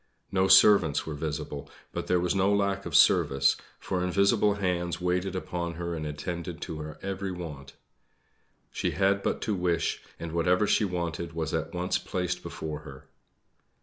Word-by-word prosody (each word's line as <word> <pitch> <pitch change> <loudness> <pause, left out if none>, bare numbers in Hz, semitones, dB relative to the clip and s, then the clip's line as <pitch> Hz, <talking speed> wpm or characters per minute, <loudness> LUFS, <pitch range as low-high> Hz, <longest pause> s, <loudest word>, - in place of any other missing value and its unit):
No 95 -1 +2
servants 95 -5 +6
were 80 - -4
visible; 75 -1 -4 0.2
but - - -4
there 90 - +3
was 90 0 +1
no 95 +1 +2
lack 100 -2 0
of 80 - -4
service, 70 0 +5 0.2
for 90 -1 -2
invisible 100 +3 +3
hands 90 -3 -1
waited 90 +1 -1
upon 85 -2 -3
her 85 0 -4
and 80 -2 -4
attended 85 +3 -5
to 80 - -5
her 75 0 -7
every 95 0 -3
want. 75 -6 -7 1.0
She - - -1
had 100 +1 +3
but - - -1
to 110 - -1
wish, 90 -3 0 0.2
and 85 -1 -5
whatever 90 +4 +2
she 105 - +3
wanted 85 -2 -3
was 80 -1 -3
at 80 +1 -2
once 90 +1 0
placed 90 -1 -3
before 75 -2 -5
her. 70 -4 -12
90 Hz, 165 wpm, -28 LUFS, 80-95 Hz, 1.0 s, servants